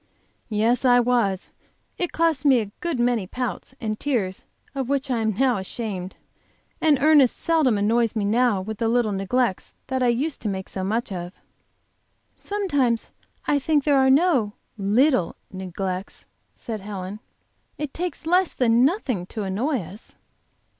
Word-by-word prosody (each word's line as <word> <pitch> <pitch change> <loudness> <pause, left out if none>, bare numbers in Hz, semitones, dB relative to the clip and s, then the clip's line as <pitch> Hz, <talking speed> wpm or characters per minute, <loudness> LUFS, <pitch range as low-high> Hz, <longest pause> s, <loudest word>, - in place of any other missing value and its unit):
"Yes, 225 +3 +1
I 245 -1 +6
was. 235 -6 +1 0.5
It 355 - 0
cost 325 -4 +1
me 270 -4 +5
a 210 -3 -4
good 340 -7 -2
many 240 -5 +1
pouts 250 +3 -5
and 215 -3 -3
tears 215 -10 -1 0.3
of 270 -2 -3
which 275 -1 0
I 240 - +1
am 220 -2 0
now 255 -3 +3
ashamed. 190 -1 -5 0.7
And 305 -3 +4
Ernest 290 -3 +5
seldom 310 -9 +2
annoys 225 +3 +2
me 210 -2 0
now 220 -1 +2
with 220 +2 -6
the 230 - +1
little 235 -2 +2
neglects 195 +2 -1
that 260 0 -2
I 250 - +3
used 265 +6 0
to - - -3
make 190 -1 -4
so 190 - -4
much 225 +4 -1
of." 175 -1 -5 1.0
"Sometimes 285 - -1 0.3
I 290 - +2
think 295 +1 +1
there 285 -2 +4
are 265 0 +4
no 270 - +3 0.2
'little' 210 - +2 0.2
neglects," 190 0 -5 0.3
said 220 -3 -6
Helen. 195 0 -6 0.6
"It 295 -2 -4
takes 350 -1 -4
less 360 +2 +2
than 235 -1 +3
nothing 260 - 0
to 215 0 -5
annoy 230 +7 -1
us." 200 +7 -12
240 Hz, 155 wpm, -24 LUFS, 205-275 Hz, 1.0 s, I